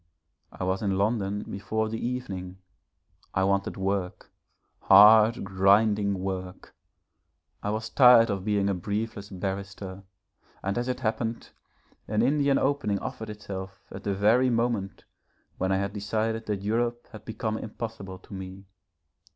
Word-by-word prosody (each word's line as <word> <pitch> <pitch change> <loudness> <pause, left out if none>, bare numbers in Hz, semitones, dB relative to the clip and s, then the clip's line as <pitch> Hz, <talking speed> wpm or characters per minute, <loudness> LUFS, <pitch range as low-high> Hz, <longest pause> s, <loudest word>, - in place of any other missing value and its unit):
I - - -6
was 95 +1 -1
in 100 -3 0
London 105 -1 0
before 110 +3 -3
the 110 +1 -4
evening. 95 -8 -4 0.8
I 95 - +2
wanted 100 0 0
work, 95 -1 -3 0.5
hard, 110 +4 +7
grinding 100 +1 +3
work, 95 -1 -5 0.9
I 105 - -3
was 110 +1 -2
tired 120 -2 +6
of 95 -2 -3
being 100 -1 +1
a 100 - +1
briefless 100 +3 -4
barrister, 95 0 -5 0.6
and 100 +1 -1
as 120 - -3
it 125 0 -3
happened, 115 0 -2 0.6
an 105 +1 +1
Indian 140 +1 +3
opening 135 -7 0
offered 110 +2 -6
itself 95 -3 -7
at 95 - -8
the 100 -1 -1
very 115 +6 +4
moment 115 -5 -1 0.6
when 95 - 0
I 95 - +2
had 100 +1 -2
decided 110 +2 -2
that 100 -2 -2
Europe 120 +3 -1
had 110 -1 -11
become 110 0 -3
impossible 110 -4 -7
to 95 - -14
me. 95 0 -8
105 Hz, 140 wpm, -27 LUFS, 95-110 Hz, 0.9 s, hard